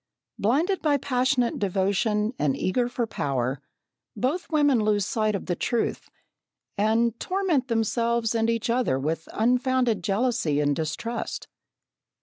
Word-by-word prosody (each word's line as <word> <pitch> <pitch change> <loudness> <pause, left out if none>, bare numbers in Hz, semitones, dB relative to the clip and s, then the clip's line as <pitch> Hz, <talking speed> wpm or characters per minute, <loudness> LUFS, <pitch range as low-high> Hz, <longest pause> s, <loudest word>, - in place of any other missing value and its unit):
Blinded 315 - +1
by 295 -2 +3
passionate 255 -2 +1
devotion 205 +3 0
and 145 -3 +1
eager 240 +6 0
for 245 -1 -1
power, 135 - -2 0.5
both 295 +9 -1
women 290 -7 +3
lose 205 -2 +2
sight 215 0 0
of 200 - -4
the 175 - -1
truth, 235 +6 -2 0.7
and 225 +2 +1
torment 365 -9 0
themselves 230 0 0
and 225 0 +1
each 230 +1 0
other 240 - +1
with 155 +4 -3
unfounded 245 -3 +1
jealousy 200 - +1
and 145 -1 +2
distrust. 165 +11 -4
230 Hz, 130 wpm, -25 LUFS, 195-250 Hz, 0.7 s, by